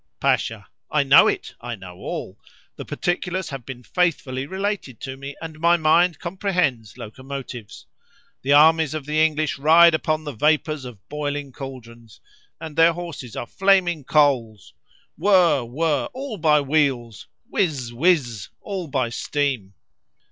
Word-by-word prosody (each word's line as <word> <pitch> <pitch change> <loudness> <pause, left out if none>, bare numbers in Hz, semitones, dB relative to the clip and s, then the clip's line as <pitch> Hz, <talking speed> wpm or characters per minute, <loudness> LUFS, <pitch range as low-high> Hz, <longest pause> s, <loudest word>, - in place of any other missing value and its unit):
Pasha.—I - - -1
know - - +7
it—I 120 0 -4
know 90 -3 -12
all—the - - -9
particulars 180 +1 -2
have 135 -4 -7
been 125 -1 -8
faithfully 140 -5 -1
related 190 - -4
to 135 -1 -6
me, 140 +1 -8
and 160 -1 -8
my 170 +1 +4
mind 165 +1 +3
comprehends 170 - -2
locomotives. 130 -1 -8 0.6
The 135 - -1
armies 155 +1 +5
of 150 -3 -5
the 155 +1 +2
English 155 -2 0
ride 165 +3 +6
upon 155 0 0
the 150 - -5
vapours 150 +2 0
of 110 -5 -12
boiling 145 -1 -4
caldrons, 120 -4 -11 0.4
and 160 -2 -8
their 165 +1 +5
horses 165 -9 -8
are - - -4
flaming 180 -1 +2
coals!—whirr! 145 - +1
whirr! 145 +4 0
all 260 -3 -6
by 155 -3 +4
wheels!—whiz! 135 - -2
whiz! 125 - +1
all 190 -4 -5
by 130 -4 -1
steam! 125 -6 -2
150 Hz, 125 wpm, -22 LUFS, 130-165 Hz, 0.6 s, know